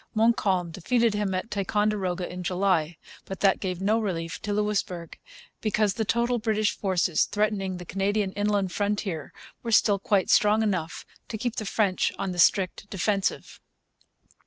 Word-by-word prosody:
Montcalm 200 -6 +2
defeated 230 +7 +1
him 205 -2 -1
at 185 +5 -4
Ticonderoga 200 -3 0
in 180 0 -7
July. 180 -3 0 0.3
But 190 - -7
that 195 -1 +4
gave 185 -3 -3
no 210 +4 +2
relief 165 -6 -3
to 210 - -3
Louisbourg; 205 -5 -2 0.5
because 215 -2 +1
the 220 - -2
total 235 +3 +1
British 215 -1 0
forces 185 -4 +1
threatening 205 -3 -1
the 180 - -8
Canadian 195 +2 0
inland 205 -2 0
frontier 200 -6 -2 0.3
were 230 - -4
still 205 -2 +4
quite 195 -1 +1
strong 215 +1 +4
enough 185 -6 -2 0.2
to 220 - -5
keep 240 +1 -3
the 215 - -2
French 195 -3 +1
on 195 - -2
the 175 - -5
strict 195 +3 +2
defensive. 195 0 -1
200 Hz, 155 wpm, -26 LUFS, 185-215 Hz, 0.5 s, that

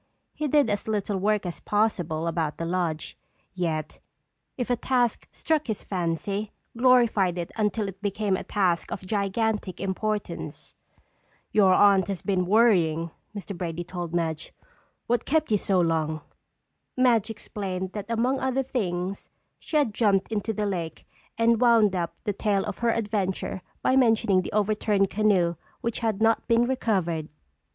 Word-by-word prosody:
He 305 - -2
did 290 -2 +4
as 205 +1 -2
little 205 -2 -1
work 210 0 +1
as 175 - -5
possible 175 -7 0
about 165 -2 -1
the 165 - -3
lodge, 170 -2 -2 0.4
yet 160 -4 -3 0.6
if 250 -1 -2
a - - +4
task 245 -1 0
struck 310 -3 -1
his 220 -3 -3
fancy, 195 +3 -2 0.2
glorified 230 -7 +4
it 170 -1 -4
until 210 -1 0
it 195 0 -8
became 205 -1 0
a - - -4
task 180 -4 0
of 190 - -5
gigantic 205 0 -1
importance. 210 +2 -3 0.8
"Your 190 -3 +5
Aunt 195 -3 +5
has 195 -3 -4
been 185 -3 0
worrying," 175 -7 +3 0.2
Mr. 200 -1 -6
Brady 175 -1 -4
told 175 -1 -6
Madge. 160 -2 -2 0.5
"What 240 +1 +1
kept 310 -3 +1
you 210 - +3
so 190 -1 +1
long?" 160 -2 0 0.8
Madge 235 -4 +3
explained 190 -4 -5
that 205 0 -6
among 245 +4 +1
other 265 0 0
things 195 -7 -3 0.3
she 310 - -2
had 280 -8 +2
jumped 205 -2 +2
into 215 +1 -1
the 210 -1 -2
lake 175 -5 -4 0.3
and 230 0 +3
wound 225 -5 +5
up 170 -2 -2
the 205 - -1
tale 200 -1 0
of 205 - -5
her 235 - +1
adventure 205 -5 -1 0.2
by 260 - +3
mentioning 225 -6 +4
the - - -6
overturned 210 -1 +1
canoe 190 -5 +2 0.2
which 235 -1 -2
had 220 -2 0
not 225 0 +2
been 230 0 +4
recovered. 185 -11 -1
205 Hz, 155 wpm, -26 LUFS, 180-225 Hz, 0.8 s, Your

